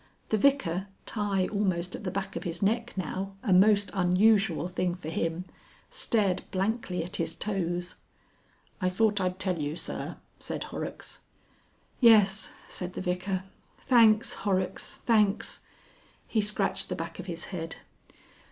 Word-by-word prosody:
The 215 - +2
Vicar, 200 -8 +2 0.2
tie 200 -3 0
almost 185 -4 0
at - - -8
the 190 - -1
back 195 +1 -4
of - - -3
his 175 0 -3
neck 230 +2 0
now, 190 +2 -3
a 200 -7 +3
most 200 +2 +5
unusual 190 -2 +3
thing 180 0 -1
for 170 -4 -7
him, 165 +2 -2 0.5
stared 210 - +1
blankly 190 -2 -1
at 175 - -5
his 165 - -1
toes. 180 -3 -2 0.8
"I 185 - +2
thought 205 +1 +2
I'd 185 0 -1
tell 185 -3 -1
you, 145 +1 -2
Sir," - - -5 0.2
said - - -3
Horrocks. - - -6 0.8
"Yes," 215 -4 +6 0.2
said 180 0 -5
the - - -4
Vicar. 185 +1 -1 0.3
"Thanks, 225 -3 +5
Horrocks, 190 -2 0
thanks!" 215 -3 +2 0.6
He 220 - +1
scratched 205 -1 0
the - - -2
back 165 +3 -6
of 185 - -7
his 170 -1 -2
head. 165 -2 -4
190 Hz, 145 wpm, -29 LUFS, 180-210 Hz, 0.8 s, Yes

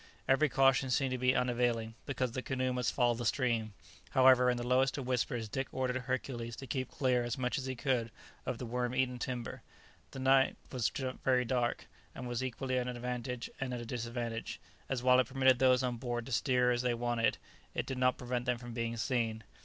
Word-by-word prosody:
Every 140 +3 +4
caution 135 0 +4
seemed 130 +1 +1
to 130 - -2
be 125 +1 +3
unavailing, 120 -2 +1
because 130 -3 -1
the 130 - -3
canoe 130 -1 -1
must 125 -3 0
follow 120 -2 +3
the 120 +1 -4
stream; 115 -4 0 0.4
however, 130 -1 +6
in 125 - +1
the 120 - -3
lowest 130 +2 +2
of 135 - -4
whispers 125 -2 -1
Dick 135 +5 -3
ordered 130 -1 -1
Hercules 125 -2 -3
to 135 - -8
keep 130 +1 -3
clear 125 -4 +1
as 120 +4 -3
much 125 +1 -1
as 130 - -5
he 130 - -3
could 125 -3 0 0.3
of 120 - -3
the 125 - -5
worm 125 +1 -2
eaten 125 -1 0
timber. 120 -1 -4 0.5
The - - -10
night 135 0 +4 0.2
was 125 -5 0
not 130 -1 -4
very 125 -1 +3
dark, 120 0 0 0.3
which 130 - -6
was 120 0 -2
equally 130 0 -1
an 125 - -2
advantage 125 0 -4
and 130 -2 -2
a 120 -1 -5
disadvantage, 115 -1 -4 0.3
as 125 -2 -2
while 125 0 +6
it 130 - +2
permitted 130 -1 +4
those 130 0 +4
on 125 -1 -1
board 120 -1 -3
to 135 - -8
steer 125 0 +3
as 120 0 +1
they 125 -1 +1
wanted, 120 -1 +1 0.4
it - - -1
did 130 -1 -4
not 125 0 +3
prevent 125 -1 -3
them 125 -1 +1
from 120 0 -8
being 115 0 -2
seen. 115 -2 -1
125 Hz, 210 wpm, -33 LUFS, 120-130 Hz, 0.5 s, however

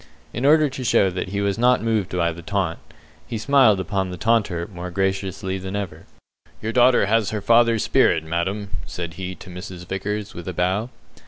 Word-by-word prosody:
In 125 - -2
order 155 +1 +6
to 135 -1 -6
show 100 -5 +3
that 90 +1 -3
he 100 +2 -2
was 100 +1 -1
not 125 -1 +3
moved 110 -5 0
by 85 -1 +2
the 85 +1 -9
taunt, 95 -2 -2 0.5
he 115 - -4
smiled 125 -4 +4
upon 95 0 -2
the 90 - -6
taunter 105 -7 +1
more 90 0 -6
graciously 95 0 -2
than 95 +1 -5
ever. 100 -2 -5 0.5
"Your 110 - -3
daughter 125 -2 +5
has 110 0 +2
her 110 - -2
father's 115 +1 +4
spirit, - - +3
madam," 95 +5 -2 0.2
said 85 -1 -5
he 95 +1 -6
to 90 - -12
Mrs. 90 -1 -8
Vickers, 100 +3 -4
with 85 0 -9
a 90 - -3
bow. 95 +7 0
100 Hz, 190 wpm, -22 LUFS, 90-115 Hz, 0.5 s, order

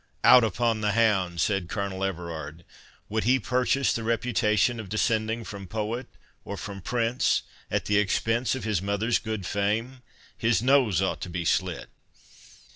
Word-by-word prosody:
"Out 125 -1 +8
upon 115 +1 0
the 105 -1 +1
hound!" 100 -6 +2
said 95 -4 0
Colonel 100 -2 -3
Everard; 85 -4 -5 0.4
"would 110 +1 -1
he 125 +4 +4
purchase 125 +4 +1
the 115 - -2
reputation 115 0 +1
of 105 -4 -7
descending 110 +2 0
from 100 -3 -8
poet, 110 +5 -3 0.4
or 100 - -6
from 100 -1 -7
prince, 120 +4 +1 0.3
at - - -1
the 105 0 +3
expense 115 +5 +1
of 130 - -6
his 105 -5 0
mother's 100 +4 0
good 110 -4 -4
fame?—his 115 +3 -2
nose 125 -6 +3
ought 95 - -2
to 90 - -5
be 85 -1 -4
slit." - - -1
110 Hz, 150 wpm, -26 LUFS, 95-115 Hz, 0.4 s, Out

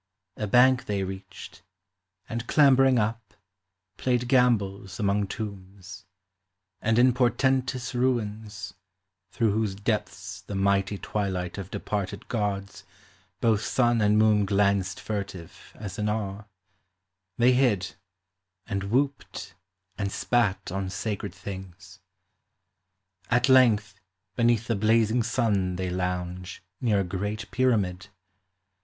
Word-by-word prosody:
A 105 - -3
bank 125 +3 +5
they 100 -3 -1
reached, 95 +1 -8 0.7
And 115 +1 -4
clambering 135 -3 +5
up, 110 -1 -2 0.6
played 125 -1 0
gambols 105 -7 +1
among 100 0 +1
tombs; 95 -3 -8 0.8
And 115 0 +1
in 125 +1 +5
portentous 130 +1 +1
ruins 110 -6 -2 0.6
(through 115 -3 +1
whose 105 -2 -1
depths, 100 -3 -3
The 100 +1 -7
mighty 100 +1 +1
twilight 95 -3 -3
of 95 -1 -7
departed 100 -1 -4
Gods, 105 -4 -3 0.6
Both 110 -2 +2
sun 120 -2 +2
and 105 0 +4
moon 105 -1 +4
glanced 100 -2 +1
furtive, 100 -5 -6
as 100 -2 -7
in 105 0 0
awe) 105 -1 -3 0.9
They 120 +2 +5
hid, 120 -8 +2 0.7
and 100 -3 -3
whooped, 135 +7 -2 0.5
and 100 -1 -1
spat 100 -7 0
on 95 0 -3
sacred 100 0 -4
things. 95 -1 -9 1.3
At 120 +2 +3
length, 115 -5 +4 0.4
beneath 120 -1 +2
the 115 - 0
blazing 110 +3 +3
sun 105 -5 0
they 90 0 -3
lounge 90 0 -4 0.2
Near 105 -5 +2
a - - 0
great 100 +4 -4
Pyramid. 100 -8 +1
105 Hz, 110 wpm, -26 LUFS, 95-120 Hz, 1.3 s, bank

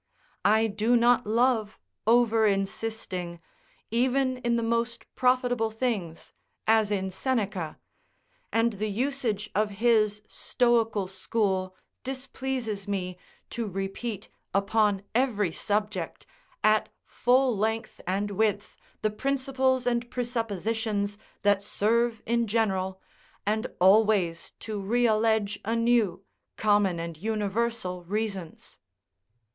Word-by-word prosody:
I 220 +2 +4
do 220 +3 +1
not 240 -1 +4
love 225 -1 +2 0.3
over 225 -1 +4
insisting, 195 -3 -2 0.5
even 255 +2 +2
in 240 -1 0
the 230 - 0
most 235 +1 -1
profitable 250 -3 +2
things, 215 -8 -3 0.3
as 220 -1 +4
in 190 -2 -1
Seneca; 200 - -2 0.7
and 230 0 +2
the 210 +1 -2
usage 230 -2 -1
of 210 0 +1
his 215 -2 +3
stoical 225 -5 +1
school 190 -1 -1 0.3
displeases 260 -5 -4
me, 185 -3 -2 0.4
to 235 -2 -3
repeat, 195 +3 -4 0.3
upon 200 0 +2
every 220 -7 +1
subject, 205 -1 -2 0.4
at 215 0 +3 0.2
full 250 0 +2
length 220 +2 -2
and 200 +3 -1
width 205 0 0 0.3
the 215 - +2
principles 260 +1 0
and 240 -1 0
presuppositions 225 -3 -2 0.2
that 205 -1 +4
serve 225 +3 0
in 235 0 +1
general, 190 -4 0 0.5
and 220 +3 0
always 190 -3 +3
to 215 -2 -4
realledge 220 -1 +2
anew 230 -4 +1 0.3
common 205 -5 +2
and 165 -1 -5
universal 210 -2 -2
reasons. 195 -3 -4
220 Hz, 105 wpm, -27 LUFS, 200-235 Hz, 0.7 s, I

